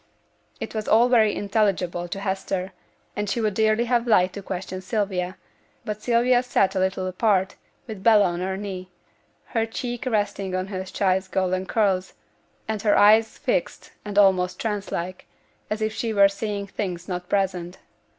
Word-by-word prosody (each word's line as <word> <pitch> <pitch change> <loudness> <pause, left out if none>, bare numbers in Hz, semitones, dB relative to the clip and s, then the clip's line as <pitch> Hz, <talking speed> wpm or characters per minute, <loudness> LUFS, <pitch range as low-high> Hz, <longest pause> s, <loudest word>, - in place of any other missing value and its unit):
This - - -6
was 215 -1 -3
all 235 +3 +5
very 220 -4 +5
unintelligible 195 -4 0
to 195 - -5
Hester, 190 -1 -2 0.4
and 210 -1 -2
she 235 - -1
would 215 -3 0
dearly 220 +2 +2
have 240 0 +1
liked 185 -5 +4
to 200 - -6
question 185 0 -5
Sylvia; 190 -2 -2 0.5
but 210 -1 -4
Sylvia 245 +1 +3
sate 245 -6 +1
a 190 - -1
little 190 0 0
apart, 190 0 +1 0.3
with 215 -5 -8
Bella 215 -1 +6
on 175 -1 -1
her 190 +1 -2
knee, 190 -2 -6 0.6
her 225 -2 0
cheek 240 +2 -4
resting 205 -4 -1
on 185 0 -1
her 190 -2 -4
child's 190 0 0
golden 185 0 -1
curls, 190 -4 +1 0.5
and 220 -2 -2
her 210 -1 +3
eyes 220 +2 +5
fixed - - -2
and 205 -1 -6
almost 185 -3 +4
trance 210 -3 -3
like, 180 +2 -4 0.4
as 215 +1 -2
if 215 0 -1
she 220 0 -2
were 200 -1 +7
seeing 200 0 -4
things 180 -3 -5
not 180 0 -5
present. 185 -3 -1
200 Hz, 170 wpm, -24 LUFS, 185-220 Hz, 0.6 s, were